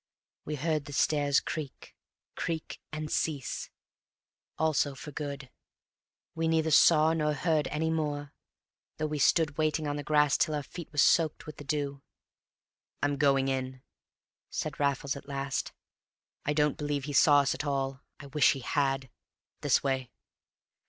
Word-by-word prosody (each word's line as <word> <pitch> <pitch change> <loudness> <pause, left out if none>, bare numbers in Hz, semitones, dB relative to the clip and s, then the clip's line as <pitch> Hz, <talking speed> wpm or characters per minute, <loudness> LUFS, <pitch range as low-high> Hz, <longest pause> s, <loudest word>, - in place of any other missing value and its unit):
We 150 - -3
heard 155 0 -1
the 145 - -8
stairs 145 0 +3
creak, 150 -4 -7 0.4
creak, 165 -2 -4
and 155 0 -5
cease, 145 -5 -2 0.9
also 150 -3 +1
for 150 +3 -9
good. 140 -2 -6 0.8
We 165 -1 -1
neither 160 -1 +2
saw 155 +1 +6
nor 150 -2 +1
heard 155 -2 +1
any 160 +1 -1
more, 145 -3 -2 0.6
though 155 - -1
we 150 -1 -2
stood 145 +1 +3
waiting 155 0 +1
on 145 0 -2
the 145 - -4
grass 150 -1 +3
till 155 - +2
our 145 - -2
feet 170 +4 -9
were 150 - -13
soaked 160 +1 +3
with 155 - -9
the - - -8
dew. 140 -1 -2 1.0
"I'm 145 0 +1
going 135 -2 +3
in," 130 -1 -3 0.7
said - - -4
Raffles 140 -1 0
at 140 - -10
last. 140 -1 -3 0.7
"I 150 - +1
don't 150 -1 +1
believe 145 -2 -2
he 145 +1 -5
saw 145 +1 +6
us 140 - +1
at - - -4
all. 135 -1 -2 0.2
I 145 - -10
wish 145 +1 +4
he 135 - -7
had. 135 +1 0 0.5
This - - +2
way." 130 -2 -1
145 Hz, 155 wpm, -29 LUFS, 140-155 Hz, 1.0 s, saw